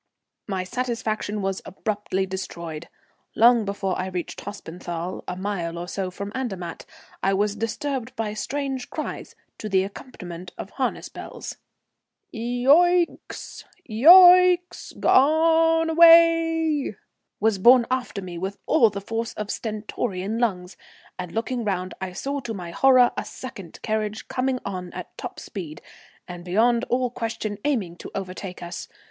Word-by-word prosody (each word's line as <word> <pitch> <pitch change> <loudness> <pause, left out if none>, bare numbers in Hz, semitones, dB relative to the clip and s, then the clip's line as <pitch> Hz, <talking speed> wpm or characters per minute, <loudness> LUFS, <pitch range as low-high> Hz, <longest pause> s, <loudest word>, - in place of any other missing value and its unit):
My 190 -3 -2
satisfaction 215 -1 -3
was 195 0 -2
abruptly 200 -1 -2
destroyed. 170 -4 -6 0.5
Long 235 -1 +5
before 195 -1 -2
I 185 - -2
reached 180 -2 -5
Hospenthal, 175 -2 -6
a 180 - -3
mile 180 -3 -3
or 175 +1 -5
so 190 0 -3
from 200 +3 -6
Andermatt, 195 -10 -5 0.3
I 195 0 +2
was 205 +1 0
disturbed 250 +3 -3
by 215 -2 -2
strange 270 +3 -3
cries - - -6 0.2
to 215 - -5
the 190 -1 +3
accompaniment 180 -4 -9
of 195 - -7
harness 260 -2 -2
bells. - - -8 0.7
"Yo 245 +5 +4
icks, 350 -1 -1 0.2
Yo 345 +11 +9 0.2
icks, 355 0 -8
G - - -15
o 325 +3 +4
ne 325 - -1
away!" 330 -4 +5 0.4
was 215 -2 +2
borne 240 +4 +7
after 245 -6 -2
me 175 -2 -7
with 195 +2 -4
all 240 -8 +5
the 200 - -6
force 225 +3 -3
of 210 -1 -4
stentorian 210 -1 -3
lungs, 185 -6 -1 0.4
and 180 -2 -5
looking 235 +3 -2
round 185 -3 -2
I 185 -1 -4
saw 280 +9 -3
to 235 -4 -5
my 175 -3 -7
horror 255 +4 +5
a - - -2
second 195 -10 -9
carriage 215 -1 -2
coming 255 0 -1
on 180 -3 -5
at - - -8
top - - -7
speed, 170 -7 -7 0.5
and 175 -1 -8
beyond 230 +7 +2
all 250 0 0
question 220 -3 -4
aiming 205 -13 -1
to - - -9
overtake 185 -1 -6
us. 175 0 -6
215 Hz, 145 wpm, -24 LUFS, 185-255 Hz, 0.7 s, Yo